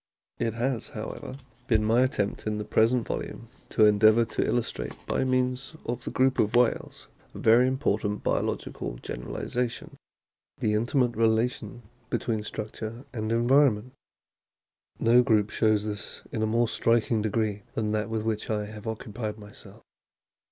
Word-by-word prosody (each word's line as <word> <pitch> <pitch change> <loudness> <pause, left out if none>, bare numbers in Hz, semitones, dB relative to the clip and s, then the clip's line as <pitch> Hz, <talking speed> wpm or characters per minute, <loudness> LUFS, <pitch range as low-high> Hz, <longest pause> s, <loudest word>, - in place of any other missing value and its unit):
It 115 -1 -1
has, 120 0 -1
however, 130 - -6 0.3
been 110 -3 +3
my 115 +3 +4
attempt 120 -6 -1
in 105 0 -1
the 105 - -4
present 115 +3 +2
volume 115 0 -5 0.2
to 110 - +4
endeavour 110 +2 +5
to - - -1
illustrate 120 -1 -2
by - - 0
means 130 +2 0
of 120 +1 -4
the - - -2
group 130 0 +2
of 105 +1 +2
whales 120 -1 +1 0.3
a - - -6
very 115 +3 +5
important 105 -6 -1
biological - - -2
generalisation, 120 - -4 0.6
the 105 - 0
intimate 120 +3 +2
rela 115 +1 +3
tion 120 -1 -10 0.3
between 110 -3 -1
structure 110 +3 -6
and 110 -2 -3
environment. 120 -1 +3 1.1
No 120 +2 +6
group 110 -4 +2
shows 110 -2 +2
this 105 -1 -5
to 110 - -1
a 110 - +2
more 115 +2 +2
striking 115 -1 +2
degree 105 -1 -1
than 110 -2 -1
that 105 0 -1
with 110 -1 -2
which 110 -1 -2
I 105 -1 -1
have 105 +1 -9
occupied 110 -1 -4
myself. 105 -1 -13
110 Hz, 150 wpm, -27 LUFS, 105-120 Hz, 1.1 s, No